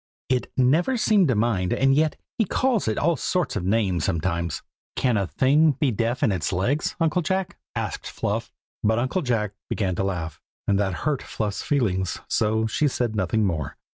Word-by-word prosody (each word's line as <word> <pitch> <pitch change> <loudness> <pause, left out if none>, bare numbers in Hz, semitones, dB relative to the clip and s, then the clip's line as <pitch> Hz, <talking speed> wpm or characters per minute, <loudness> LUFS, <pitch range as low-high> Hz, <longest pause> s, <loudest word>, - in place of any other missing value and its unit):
"It 130 -1 0
never 155 - +3
seems 210 -5 +4
to 125 - +2
mind, 105 -5 +1
and 135 0 +3
yet 155 +2 +2 0.2
he 220 - +4
calls 245 - +1
it 110 - 0
all 170 +2 +2
sorts 180 -1 -1
of 100 - -2
names 95 -4 +1
sometimes." 85 0 -1 0.3
"Can 125 -3 +2
a 100 -3 0
thing 145 - +3
be 135 0 +1
deaf 115 +3 -1
in 110 - +4
its 90 -5 -1
legs, 120 - 0
Uncle 165 +1 +2
Jack?" 190 +1 -2 0.2
asked - - -3
Fluff. - - -3 0.3
But 110 +1 +3
Uncle 130 +9 0
Jack 115 - 0 0.2
began 95 -3 0
to - - 0
laugh, 90 -5 -3 0.3
and 100 -1 +3
that 95 -2 0
hurt 150 -3 +1
Fluff's 105 -2 -3
feelings, 95 -10 0
so 110 +1 +1
she 130 +7 +1
said 120 -4 -1
nothing 105 +2 +1
more. 80 -7 -2
115 Hz, 185 wpm, -24 LUFS, 95-150 Hz, 0.3 s, seems